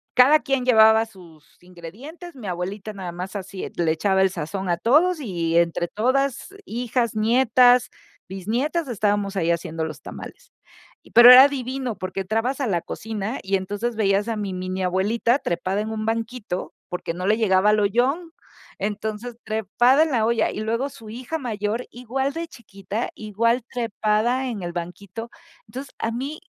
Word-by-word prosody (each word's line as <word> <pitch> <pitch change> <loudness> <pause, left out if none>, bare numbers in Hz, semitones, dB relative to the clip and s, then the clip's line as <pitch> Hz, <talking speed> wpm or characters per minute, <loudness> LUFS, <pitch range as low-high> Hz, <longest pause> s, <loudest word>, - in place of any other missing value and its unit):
cada 285 +5 +6
quien 270 -2 0
llevaba 220 -2 +5
sus 170 -7 -18
ingredientes, 225 - -11
mi 245 -5 -10
abuelita 195 +4 -4
nada 190 -3 -6
más 180 +3 -7
así 195 -1 -5
le 165 -2 +1
echaba 190 +4 +1
el 190 - +4
sazón 185 +2 -4
a 170 - +1
todos 310 - +3
y 170 - -1
entre 170 0 +1
todas, 260 - -1
hijas, 240 - -1
nietas, 245 +2 +4 0.4
bisnietas, 240 - -2
estábamos 205 -3 0
ahí 170 -3 0
haciendo 165 -1 -1
los 155 -1 -8
tamales. - - -10 0.5
Y - - -20
pero 240 +1 +10
era 260 +2 +10
divino, 260 -3 -4
porque 185 +1 -5
entrabas 225 +8 -1
a 265 - 0
la 175 -5 0
cocina 220 +4 -5
y 195 +1 0
entonces 205 +5 -3
veías 200 -1 +1
a 230 - -1
mi 205 -3 -3
mini 185 +1 -3
abuelita 215 +8 +1
trepada 190 +1 -2
en 215 - -4
un 215 -1 -3
banquito, 225 -4 -3 0.2
porque 180 -2 -4
no 180 +1 -4
le 210 +2 +3
llegaba 205 -2 +3
al 215 - +3
ollón. 255 - 0 0.4
Entonces, 215 +3 -4
trepada 220 - +3
en 320 - -2
la 230 -4 +2
olla, 235 0 +1
y - - -6
luego 230 +5 -1
su 225 -5 -13
hija 255 +8 -5
mayor, 220 -2 -3
igual 265 +3 -3
de 330 +1 -4
chiquita, 205 - -6
igual 230 +3 0
trepada 235 +2 0
en 225 -5 -4
el 175 0 -5
banquito. 195 +6 -7 0.4
Entonces, 265 +2 -8
a 225 - -1
mí 275 +7 -4
220 Hz, 165 wpm, -23 LUFS, 190-250 Hz, 0.5 s, pero